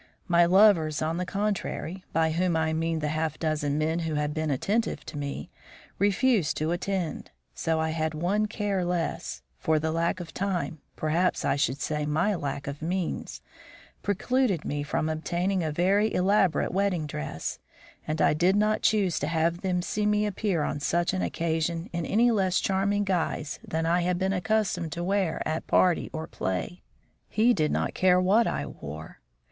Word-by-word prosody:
My 175 -1 +5
lovers 175 -5 +5
on 160 +2 -1
the 180 0 -2
contrary 195 -3 -2
by 160 -1 +2
whom 170 +1 +1
I 160 0 +1
mean 165 0 -1
the 150 - -1
half 155 0 -1
dozen 150 -3 -1
men 160 +2 0
who 165 -2 -2
had 150 0 -1
been 155 0 -1
attentive 205 - -1
to - - -8
me 140 -1 -5 0.5
refused 205 - +2
to 155 +2 0
attend, 180 -1 -2 0.2
so 160 -1 -1
I 160 0 0
had 160 0 -1
one 195 +7 +1
care 205 -3 -1
less; 170 - -2 0.2
for 160 - +2
the 160 +1 -1
lack 170 +3 0
of 175 -2 -8
time 185 -5 -2 0.2
perhaps 165 +4 0
I - - +2
should 140 -1 0
say 150 -1 -2
my 175 +8 +1
lack 140 -5 -3
of 140 +1 -6
means 175 +2 -3 0.6
precluded 205 - 0
me 145 0 -2
from 150 +1 -1
obtaining 175 +4 -1
a 155 - -1
very 195 +7 +2
elaborate 190 -1 +2
wedding 190 -4 0
dress, 75 - -5 0.5
and 155 +1 -2
I - - +4
did 175 +5 +3
not 215 +1 +2
choose 200 -5 +2
to 145 - -2
have 165 +2 0
them 180 -2 0
see 210 +3 -1
me 210 0 +2
appear 200 -5 0
on 145 - -2
such 170 +5 +1
an 185 - -1
occasion 165 0 -1
in 170 -1 -2
any 235 +3 +4
less 190 -4 +2
charming 200 +1 +1
guise 170 -6 -1
than 160 +1 -2
I 170 +2 +2
had 180 0 0
been 190 +1 0
accustomed 185 -4 0
to 170 0 -4
wear 190 -3 0
at 155 +1 -3
party 180 -2 +3
or 160 0 -4
play. 95 - -3 0.5
He 230 +3 +4
did 155 -7 +1
not - - -1
care 180 -1 +4
what 205 +6 +4
I - - -2
wore. 75 +2 -9
170 Hz, 180 wpm, -27 LUFS, 155-195 Hz, 0.6 s, My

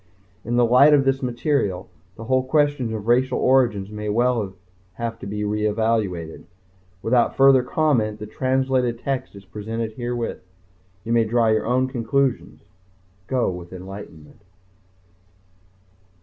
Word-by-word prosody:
In 120 +2 -2
the 120 0 +4
light 135 +5 +6
of 135 -2 +2
this 135 0 +1
material, 125 - -1 0.3
the 115 - -9
whole 130 +2 +1
question 145 -3 +1
of 110 -2 -5
racial 125 +3 +2
origins 120 -7 +2
may 105 0 -5
well 115 -3 0 0.4
have 115 +2 -5
to - - -8
be 105 +1 -3
reevaluated. 105 -5 -1 0.6
Without 120 +1 +2
further 135 -1 +6
comment, 125 -6 0
the 105 - -7
translated 130 +1 0
text 130 -2 -4
is 100 0 -12
presented 110 +3 -5
herewith. 120 0 -4 0.6
You 115 - -2
may 115 -1 +3
draw 115 0 +2
your 110 0 +1
own 130 +2 +2
conclusions. 130 +1 -1 0.6
Go 125 -6 0
with 90 -1 -9
enlightenment. 95 -4 -11
115 Hz, 135 wpm, -22 LUFS, 105-130 Hz, 0.6 s, light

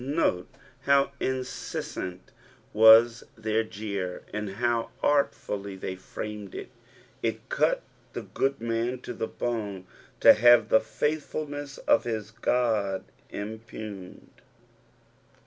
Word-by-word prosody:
Note 135 - 0 0.4
how 140 0 +4
incesBant 125 -7 -4 0.5
nas 110 +2 +7
their 110 0 0
jeer, 100 -4 -5
and 105 -1 -3
how 120 0 0
artfully 105 -8 0
they 95 0 -5
framed 105 +1 -7
it - - -6 0.5
1 - - +1
It - - -23
cut - - +1 0.3
the - - -5
good 135 +1 -1
man 115 +2 -1
to 120 - -6
the 110 - -3
bone 105 -6 -3 0.3
to - - +9
have 120 +2 +6
the 110 - +6
faithfulness 145 +2 -3
of - - +2
his 110 -2 -3
Qod 110 -5 0 0.3
impugned. 110 -2 -8
110 Hz, 115 wpm, -27 LUFS, 105-125 Hz, 0.5 s, to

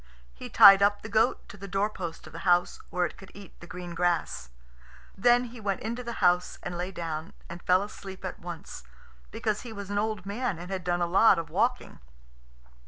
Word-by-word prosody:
He 60 - -9
tied 195 0 +9
up 205 +1 +2
the 215 - -7
goat 225 +3 +2
to 210 - -11
the 200 0 -8
doorpost 195 -3 -3
of 155 - -13
the 165 - -7
house, 175 -1 +2
where 180 0 0
it - - -7
could 195 - -13
eat 200 -3 -13
the 175 - -12
green 175 -1 -7
grass. 170 - -1 0.7
Then 240 +4 +4
he 240 -1 -9
went 200 -3 -2
into 235 +3 -4
the 235 -1 -5
house 180 0 +2
and 175 - -5
lay 180 +2 -4
down, 165 -3 -5
and 170 +1 -9
fell 185 +2 +3
asleep 195 -2 -9
at 185 - -6
once, 170 -2 -8 0.5
because 210 - -2
he 240 - -9
was 200 -2 -7
an 205 - 0
old 215 -3 -2
man 200 -2 -2
and 175 +3 -9
had 190 -2 -3
done 175 0 0
a - - +2
lot 190 +6 +5
of 165 -1 -5
walking. - - -1
190 Hz, 210 wpm, -28 LUFS, 175-205 Hz, 0.7 s, tied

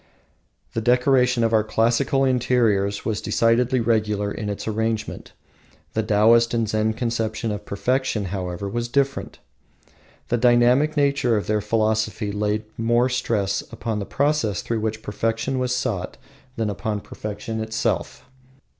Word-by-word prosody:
The 115 - -1
decoration 125 0 +3
of 115 0 +1
our 110 -1 +4
classical 120 +5 +1
interiors 115 -6 +1
was 110 -2 -1
decidedly 120 +2 +2
regular 105 -3 0
in 105 -1 -4
its 100 - -5
arrangement. 110 0 -3 0.6
The 110 - +1
Taoist 115 +3 +4
and 115 -1 +1
Zen 110 +1 0
conception 115 -1 -2
of 105 - -5
perfection, 125 0 -1
however, 90 0 -4
was 120 +4 -2
different. 135 +2 -1 0.9
The 120 - +2
dynamic 125 +5 +4
nature 140 -5 +2
of 105 - -2
their 105 0 0
philosophy 110 0 0
laid 105 +1 -1 0.2
more 120 +2 +2
stress 110 -6 0
upon 115 -2 -3
the 100 - -4
process 140 -9 0
through 115 -1 -2
which 110 0 -3
perfection 115 +5 -1
was 125 0 0
sought 100 -8 -3 0.4
than 110 -4 -1
upon 105 +1 -3
perfection 110 +3 -6
itself. 110 0 -2
115 Hz, 135 wpm, -23 LUFS, 105-125 Hz, 0.9 s, our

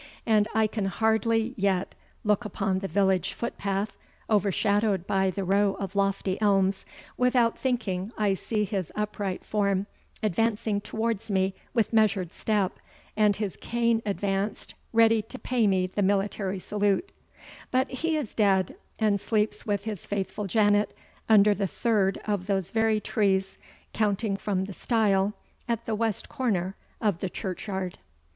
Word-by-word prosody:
And 215 -2 +3
I 220 0 +4
can 215 -1 -2
hardly 220 +3 +1
yet 195 -2 0 0.3
look 210 +2 +2
upon 195 -2 -1
the 195 - -3
village 190 0 +1
footpath, 200 -3 -3 0.4
overshadowed 205 -1 +2
by 190 -1 +2
the 195 +1 -3
row 200 +1 +2
of 195 0 -5
lofty 195 0 0
elms, 195 -2 +2 0.3
without 250 -2 +3
thinking 215 -6 -1
I 205 -2 +2
see 210 +2 -1
his 195 -4 -3
upright 205 -2 -3
form 200 -2 +1 0.4
advancing 215 +1 +1
towards 225 0 -2
me 190 -1 +1 0.2
with 230 -1 +1
measured 200 -5 +2
step, 205 -4 0 0.4
and 210 -1 +4
his 205 -2 -3
cane 235 -1 +1
advanced, 200 0 -2 0.2
ready 225 -1 +5
to 225 +5 -8
pay 245 -4 +1
me 190 -2 +2
the 185 +3 -2
military 195 0 0
salute 205 - 0 0.6
but 260 +1 +2
he 320 +4 -1
is 280 -8 -4
dead, 195 -4 +2 0.2
and 205 -3 +2
sleeps 210 +1 0
with 205 -1 0
his 210 -4 -5
faithful 205 +1 -3
Janet, 205 +1 +3 0.3
under 210 -1 +7
the 200 -1 -1
third 200 -1 +1
of 205 -3 -1
those 195 -2 -1
very 220 -1 +2
trees, 195 -3 0 0.3
counting 205 -1 +1
from 195 -1 -1
the 200 - -7
stile 205 -2 +1 0.3
at 235 -1 -1
the 225 - -2
west 220 -1 -1
corner 195 -8 -1 0.2
of 205 -6 0
the 190 - -2
churchyard. 190 0 -4
205 Hz, 145 wpm, -27 LUFS, 195-220 Hz, 0.6 s, under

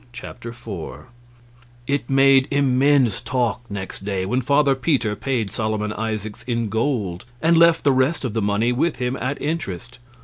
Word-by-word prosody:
Chapter 120 -1 -8
4 115 -2 -8 0.8
It 140 -2 -2
made 135 0 +5
immense 135 -4 +3
talk 125 -1 -1
next 95 -1 -6
day, 95 -2 -2
when 125 +7 0
Father 140 +2 +3
Peter 130 -6 0
paid 115 -5 -2
Solomon 110 -1 -2
Isaacs 110 0 -4
in 115 -3 -1
gold 110 -6 -1
and 165 +3 +3
left 165 0 +5
the 140 - +4
rest 130 +3 +1
of 120 - -3
the 115 - 0
money 105 +4 +1
with 130 +6 0
him 125 +1 -2
at 135 +3 -3
interest. 125 - -4
125 Hz, 160 wpm, -22 LUFS, 110-135 Hz, 0.8 s, made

